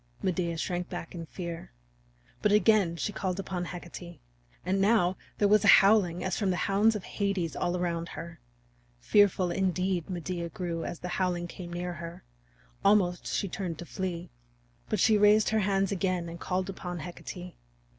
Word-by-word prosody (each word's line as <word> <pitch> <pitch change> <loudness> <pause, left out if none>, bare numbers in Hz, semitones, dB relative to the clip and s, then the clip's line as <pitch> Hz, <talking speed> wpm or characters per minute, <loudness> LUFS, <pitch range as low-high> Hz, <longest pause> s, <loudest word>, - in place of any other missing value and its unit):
Medea 175 -3 0
shrank 175 +2 -2
back 175 -2 -6
in 165 -2 -7
fear. 170 0 -6 0.7
But 210 - +3
again 205 -4 +4
she 205 +5 -3
called 190 -1 -2
upon 185 -2 -3
Hecate. 175 -1 -8 0.5
And 190 +1 +1
now 195 -3 +3 0.2
there 205 - +3
was 210 +1 +5
a - - +3
howling 195 -4 +4
as 185 -1 -1
from 200 -3 +1
the 185 - +1
hounds 210 +3 +3
of 205 - -4
Hades 195 -5 -2
all 175 +1 0
around 170 -1 -2
her. 170 +1 -8 0.6
Fearful, 190 - +3
indeed, 185 -2 0
Medea 175 -1 -3
grew 170 -2 -4
as 170 - -4
the - - -4
howling 180 -2 0
came 175 0 -8
near 175 +1 -3
her; 170 0 -8 0.6
almost 190 -3 +3
she 200 - -1
turned 180 -3 -4
to 175 - -7
flee. 175 -1 -4 0.6
But 215 - 0
she 215 +2 +5
raised 210 +1 +5
her 220 - +2
hands 195 -1 +1
again 185 -2 -1
and 170 +1 -8
called 185 0 -1
upon 180 -3 -5
Hecate. 180 +2 -8
180 Hz, 170 wpm, -29 LUFS, 175-195 Hz, 0.7 s, was